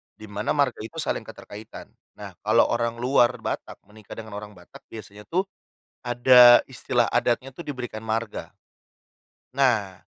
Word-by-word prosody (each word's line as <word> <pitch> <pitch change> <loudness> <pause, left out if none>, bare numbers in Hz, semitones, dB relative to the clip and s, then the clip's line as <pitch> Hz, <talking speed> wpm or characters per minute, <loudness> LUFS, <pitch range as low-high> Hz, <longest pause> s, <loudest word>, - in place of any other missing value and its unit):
di 110 - -16
mana 105 +5 -3
marga 140 -4 +1
itu 110 - -9
saling - - -3
keterkaitan. 105 +2 -11 0.2
Nah - - -9
kalau - - +3
orang 115 0 -1
luar 120 0 +2
Batak - - -5
menikah 105 +1 -13
dengan 110 -1 -9
orang 105 0 -12
Batak 90 -1 -16
biasanya 105 -1 -12
tuh 185 +3 0 0.6
ada 120 0 +7
istilah 120 -2 -1
adatnya 120 +2 -1
tuh 170 - -8
diberikan 125 -7 -6
marga. 110 0 -4 1.0
Nah 110 -9 +1
115 Hz, 140 wpm, -24 LUFS, 105-125 Hz, 1.0 s, ada